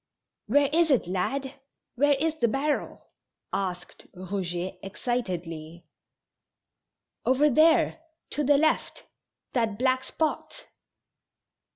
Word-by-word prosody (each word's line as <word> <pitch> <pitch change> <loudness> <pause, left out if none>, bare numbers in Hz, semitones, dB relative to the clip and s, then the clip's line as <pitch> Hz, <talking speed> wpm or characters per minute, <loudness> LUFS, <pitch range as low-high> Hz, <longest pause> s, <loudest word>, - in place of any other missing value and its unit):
"Where 280 +6 +4
is 335 0 +4
it, 265 -9 +3
lad? 265 +10 -2 0.3
Where 285 +3 +3
is 310 +3 0
the 255 -7 +1
barrel?" 280 +6 -2 0.5
asked 180 -2 -4
Eouget, 185 -1 -4
excitedly. 175 -7 -4 1.4
"Over 285 +3 +3
there, 320 +5 +4 0.3
to 295 - -1
the 285 +1 +4
left; 315 +2 0 0.5
that 225 -5 0
black 255 +1 +1
spot." 320 - -3
255 Hz, 95 wpm, -27 LUFS, 185-290 Hz, 1.4 s, Where